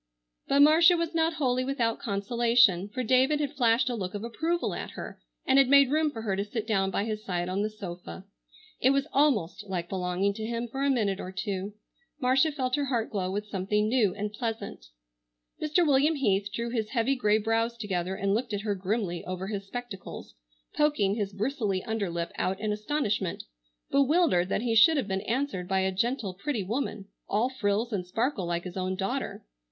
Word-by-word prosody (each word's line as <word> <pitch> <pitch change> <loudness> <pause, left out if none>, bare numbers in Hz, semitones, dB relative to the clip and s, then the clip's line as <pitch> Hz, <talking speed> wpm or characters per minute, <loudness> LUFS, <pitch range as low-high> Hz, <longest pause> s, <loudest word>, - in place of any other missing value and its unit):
But 280 +1 +4
Marcia 325 +4 +6
was 335 0 -2
not 325 0 +2
wholly 255 -4 +1
without 250 -4 -1
consolation, 225 -2 +2
for 255 +5 -3
David 260 +5 +3
had 290 -1 -2
flashed 240 -2 +3
a 250 - 0
look 195 -4 -4
of 205 - -4
approval 325 +9 -1
at - - -5
her - - -8 0.2
and 265 +1 +5
had 270 - +5
made 280 -1 +6
room 310 0 +2
for 225 -6 -7
her 200 -3 0
to 200 - -1
sit 215 +1 -4
down 195 -4 +1
by 195 - -1
his 215 -1 -4
side 175 -3 -2
on 185 +2 -1
the 215 - 0
sofa. 185 -2 -8 0.5
It 260 - +4
was 275 0 +2
almost 215 - +2
like 175 -3 -3
belonging 185 +1 0
to 220 - -6
him 235 +1 -3
for 270 +4 -4
a 280 - +2
minute 210 -7 +1
or 185 - -6
two. 195 +1 -4 0.4
Marcia 265 +4 +3
felt 260 -2 -1
her 290 - 0
heart 240 -4 -1
glow 185 -3 -1
with 205 +2 -3
something 210 +1 0
new 220 -5 +2
and 210 +1 -4
pleasant. 225 - -5 0.7
Mr. 310 +3 +2
William 290 +2 +3
Heath 200 -7 +1
drew 235 +2 -3
his 220 -3 -2
heavy 255 +2 +1
grey 215 -4 +3
brows 225 +2 0
together 190 -4 -2
and 195 +1 0
looked 230 +1 -1
at 205 - -1
her 210 -1 -1
grimly 190 -2 -2
over 185 +1 -4
his 200 -2 -4
spectacles, 245 -4 -7 0.4
poking 290 -10 +2
his 205 -2 -2
bristly 205 -2 -1
under 220 -4 -2
lip 170 0 -3
out 190 +1 -1
in 215 0 -1
astonishment, 210 - -1 0.5
bewildered 280 - +3
that 220 - 0
he 235 -2 0
should 260 +9 +6
have 265 - -1
been 190 -1 -1
answered 235 -7 -2
by 190 0 +1
a 190 0 +1
gentle, 215 0 -1
pretty 220 +3 -3
woman, 210 -1 -3 0.2
all 225 +5 +1
frills 225 -2 -1
and 180 -3 -2
sparkle 225 -1 -1
like 170 0 -2
his 180 -1 -8
own 185 0 -1
daughter. 245 +8 -3
220 Hz, 200 wpm, -28 LUFS, 195-260 Hz, 0.7 s, Marcia